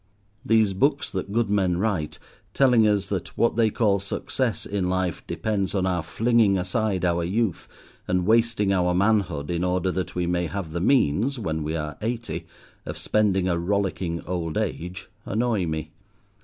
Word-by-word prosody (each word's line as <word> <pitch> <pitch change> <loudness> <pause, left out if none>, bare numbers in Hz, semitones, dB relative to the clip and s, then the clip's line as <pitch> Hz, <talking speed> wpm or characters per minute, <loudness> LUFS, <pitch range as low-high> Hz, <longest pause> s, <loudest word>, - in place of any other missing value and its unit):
These 110 -3 +3
books 140 +9 +1
that 95 +1 -4
good 110 -1 +1
men 95 -4 +2
write, 90 -6 -1 0.4
telling 125 -5 +5
us 100 -2 +2
that 95 -3 -4
what 115 - +2
they 115 -1 +3
call 105 -2 +2
"success" 110 +4 -2
in 95 -3 -1
life 95 -2 -1
depends 105 -3 -1
on 95 -1 +1
our 90 -2 0
flinging 110 +4 +2
aside 95 0 0
our 85 -1 +1
youth 100 +2 -1 0.4
and 90 -1 +1
wasting 110 -2 +3
our 90 -1 +2
manhood 95 -7 +1
in 85 0 -1
order 90 +1 +1
that 95 0 -4
we 90 -1 0
may 90 0 0
have 95 -3 -5
the 85 +1 -3
means 125 - +2
when 80 -8 -2
we 75 +2 -2
are 75 -1 -4
eighty 115 +1 -3 0.4
of - - -6
spending 100 -4 +1
a 85 -2 +1
rollicking 90 -2 -1
old 85 -3 -3
age, 90 +2 -3 0.2
annoy 110 -4 0
me. 80 -1 -4
95 Hz, 170 wpm, -25 LUFS, 90-110 Hz, 0.4 s, telling